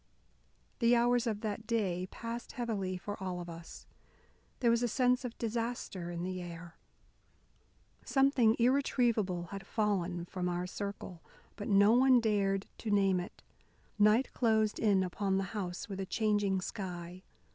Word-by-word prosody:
The 235 Hz, 0 st, +5 dB
hours 240 Hz, 0 st, +3 dB
of 215 Hz, -2 st, -2 dB
that 215 Hz, -1 st, -4 dB
day 190 Hz, -6 st, 0 dB
passed 230 Hz, +1 st, -6 dB
heavily 205 Hz, -7 st, -2 dB
for 205 Hz, +2 st, -7 dB
all 185 Hz, -2 st, -3 dB
of 175 Hz, -, -7 dB
us. 170 Hz, 0 st, -10 dB, 0.7 s
There 235 Hz, -2 st, +3 dB
was 235 Hz, 0 st, +2 dB
a 245 Hz, -, +2 dB
sense 250 Hz, +2 st, +2 dB
of 245 Hz, -2 st, -6 dB
disaster 230 Hz, -6 st, -3 dB
in 175 Hz, 0 st, -4 dB
the 185 Hz, 0 st, -3 dB
air. 170 Hz, -1 st, -9 dB, 1.3 s
Something 270 Hz, -5 st, +3 dB
irretrievable 235 Hz, -7 st, +2 dB
had 195 Hz, 0 st, -7 dB
fallen 185 Hz, -5 st, -1 dB
from 180 Hz, 0 st, -3 dB
our 175 Hz, 0 st, -2 dB
circle. 190 Hz, -2 st, -6 dB, 0.3 s
But 205 Hz, -, -6 dB
no 200 Hz, 0 st, +5 dB
one 255 Hz, +1 st, +6 dB
dared 200 Hz, -3 st, +1 dB
to 225 Hz, -, -4 dB
name 195 Hz, -3 st, +3 dB
it. 175 Hz, -, -8 dB, 0.6 s
Night 215 Hz, +5 st, +4 dB
closed 220 Hz, -3 st, +2 dB
in 200 Hz, -4 st, +3 dB
upon 190 Hz, +1 st, -1 dB
the 195 Hz, -, 0 dB
house 185 Hz, -3 st, -4 dB
with 195 Hz, -2 st, -6 dB
a 190 Hz, -, -3 dB
changing 205 Hz, -3 st, +1 dB
sky. 180 Hz, -2 st, -6 dB
205 Hz, 150 wpm, -32 LUFS, 185-230 Hz, 1.3 s, one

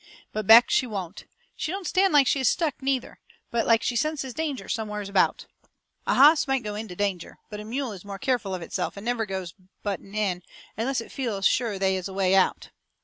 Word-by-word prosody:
But 215 Hz, -2 st, -3 dB
Beck, 230 Hz, +2 st, +8 dB
she 255 Hz, -, +2 dB
won't. 195 Hz, -4 st, -6 dB, 0.3 s
She 310 Hz, -, -3 dB
don't 390 Hz, 0 st, -5 dB
stand 385 Hz, +1 st, +2 dB
like 290 Hz, -2 st, +6 dB
she 275 Hz, -, +2 dB
is 260 Hz, -, +3 dB
stuck, 315 Hz, -6 st, -1 dB
neither, 265 Hz, -2 st, -2 dB, 0.3 s
but 235 Hz, -1 st, 0 dB
like 230 Hz, 0 st, +4 dB
she 245 Hz, -, -1 dB
senses 275 Hz, 0 st, -1 dB
danger 310 Hz, -3 st, -3 dB
somewheres 210 Hz, -2 st, -3 dB
about. 200 Hz, -1 st, +2 dB, 0.6 s
A -, -, +2 dB
hoss 295 Hz, +3 st, +6 dB
might 270 Hz, -2 st, 0 dB
go 210 Hz, -1 st, -4 dB
ahead 215 Hz, +2 st, -5 dB
into 180 Hz, -4 st, -9 dB
danger, 195 Hz, -3 st, -3 dB
but 210 Hz, -, -6 dB
a -, -, -6 dB
mule 250 Hz, +3 st, -3 dB
is 190 Hz, -4 st, -9 dB
more 200 Hz, -1 st, -7 dB
careful 240 Hz, -6 st, -1 dB
of 180 Hz, -, -6 dB
itself 180 Hz, +3 st, -4 dB
and 200 Hz, -, -8 dB
never 235 Hz, -2 st, -1 dB
goes 190 Hz, -3 st, -5 dB, 0.3 s
butting 200 Hz, 0 st, -5 dB
in 195 Hz, -4 st, 0 dB, 0.3 s
unless 240 Hz, +3 st, -1 dB
it -, -, -11 dB
feels 225 Hz, -8 st, -3 dB
sure 225 Hz, -3 st, +2 dB
they 190 Hz, 0 st, +1 dB
is 185 Hz, 0 st, -3 dB
a 195 Hz, -, -8 dB
way 190 Hz, -1 st, +2 dB
out. 190 Hz, -1 st, +2 dB
220 Hz, 220 wpm, -26 LUFS, 195-265 Hz, 0.6 s, Beck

